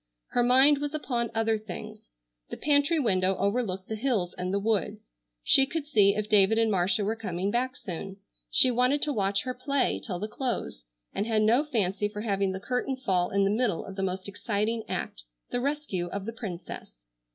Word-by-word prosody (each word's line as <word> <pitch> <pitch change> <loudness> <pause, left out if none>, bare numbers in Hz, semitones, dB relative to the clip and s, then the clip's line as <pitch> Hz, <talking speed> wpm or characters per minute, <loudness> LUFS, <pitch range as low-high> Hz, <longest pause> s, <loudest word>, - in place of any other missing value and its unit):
Her 245 - +1
mind 265 +4 +6
was 290 +1 -3
upon 240 -6 -2
other 225 -1 +1
things. 215 +1 -9 0.4
The - - -6
pantry 290 +2 +3
window 190 -8 +2
overlooked 200 -3 -1
the 220 - -3
hills 215 -7 -1
and 180 0 -3
the 200 - +1
woods. 205 - -2 0.3
She 270 0 +5
could 320 0 -3
see 205 -8 +4
if 210 0 -2
David 210 +1 +5
and 225 -1 +2
Marcia 190 +2 +1
were 220 +2 0
coming 195 -3 -3
back 255 +3 -1
soon. 190 +2 -6 0.3
She 255 - +5
wanted 250 +4 +2
to 295 - 0
watch 200 -3 0
her 255 - -3
play 270 +2 0
till 185 -6 -4
the 210 +4 -4
close, 230 - -3 0.3
and 205 - -2
had 220 -2 +2
no 235 +6 +4
fancy 210 - 0
for 210 0 -7
having 200 -3 0
the 190 - -4
curtain 255 +4 -2
fall 185 -8 0
in 200 0 +1
the 195 - +2
middle 215 -5 0
of 195 - -9
the 195 - -3
most 190 0 -3
exciting 215 +2 -2
act, - - -4 0.3
the 245 - -1
rescue 280 -11 -2
of 195 +2 -5
the 230 - -5
princess. 195 -7 -7
215 Hz, 195 wpm, -28 LUFS, 195-250 Hz, 0.4 s, mind